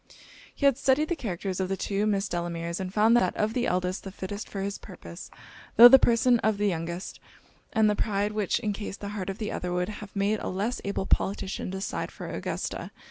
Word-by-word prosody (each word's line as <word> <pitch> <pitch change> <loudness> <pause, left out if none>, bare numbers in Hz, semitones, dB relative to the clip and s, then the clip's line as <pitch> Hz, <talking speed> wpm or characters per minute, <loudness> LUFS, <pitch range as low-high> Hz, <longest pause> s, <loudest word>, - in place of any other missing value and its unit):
He 280 - -1
had 275 -2 +4
studied 280 +3 +2
the 345 - +1
characters 190 - -4
of 185 -1 -1
the 195 - -1
two 205 +2 -1
Miss 200 -1 +1
Delameres, 170 -1 -3
and 185 -1 -4
found 220 +3 +4
that 185 -7 +2
of 215 +1 0
the 245 0 0
eldest 180 +1 -1
the 195 - -7
fittest 200 +2 -6
for 195 - -4
his 200 +1 -3
purpose; 85 0 -10 0.5
tho' 235 +2 +12
the 265 +1 +9
person 240 0 +4
of 220 -2 +1
the 205 0 +1
youngest, 170 +1 -4 0.5
and 220 -1 +3
the 210 - +2
pride 205 0 0
which 210 -1 0
encased 205 -2 -4
the 200 - -4
heart 200 -2 -4
of 195 - -4
the 215 - -3
other, 180 - -3
would 180 +2 -1
have 210 -1 -9
made 200 +2 +1
a - - -5
less 205 +7 -2
able 200 -1 -2
politician 195 -1 -1
decide 190 +1 -3
for - - -8
Augusta. - - -4
200 Hz, 215 wpm, -27 LUFS, 185-215 Hz, 0.5 s, tho